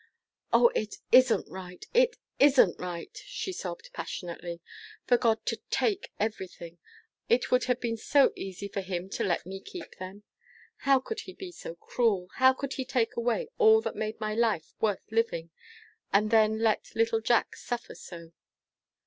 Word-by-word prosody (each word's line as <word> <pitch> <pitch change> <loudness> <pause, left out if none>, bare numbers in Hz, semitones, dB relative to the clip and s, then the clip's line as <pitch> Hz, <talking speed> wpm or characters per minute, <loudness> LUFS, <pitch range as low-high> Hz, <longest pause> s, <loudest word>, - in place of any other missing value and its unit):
"O, 475 - +6
it 215 - -3 0.2
isn't 255 -2 +6
right! 180 -1 -9
It - - +4 0.2
isn't 270 - +5
right," 180 - -6
she 380 - -5
sobbed, - - -6
passionately, 175 - -6 0.5
"for 245 - +5
God 225 -2 +1
to - - -2
take 405 -2 0
everything! 185 -5 -4 0.5
It 240 +1 +2
would 250 0 +4
have 250 -1 +1
been 230 -1 -2
so 275 +5 +4
easy 195 +1 -6
for 200 0 -3
him 185 -1 -4
to - - -2
let 175 - 0
me 190 +1 -6
keep 350 - -10
them. 190 +3 -8 0.7
How 270 -1 +7
could 440 - -5
he 375 -3 -8
be 370 -1 -8
so 170 - -8
cruel? 195 -1 0
How 260 0 +7
could 270 +1 -4
he 265 - -3
take 255 -3 0
away 245 - 0
all 440 -1 +7
that - - -4
made 215 +1 -3
my 215 -1 -2
life 220 -7 0
worth 210 -3 +1
living, 170 -8 0 0.6
and 210 +2 +3
then 220 -1 +4
let 220 -1 0
little 225 0 +2
Jack 235 +1 +2
suffer 245 -1 -5
so?" 170 -2 -11
225 Hz, 165 wpm, -29 LUFS, 190-260 Hz, 0.7 s, How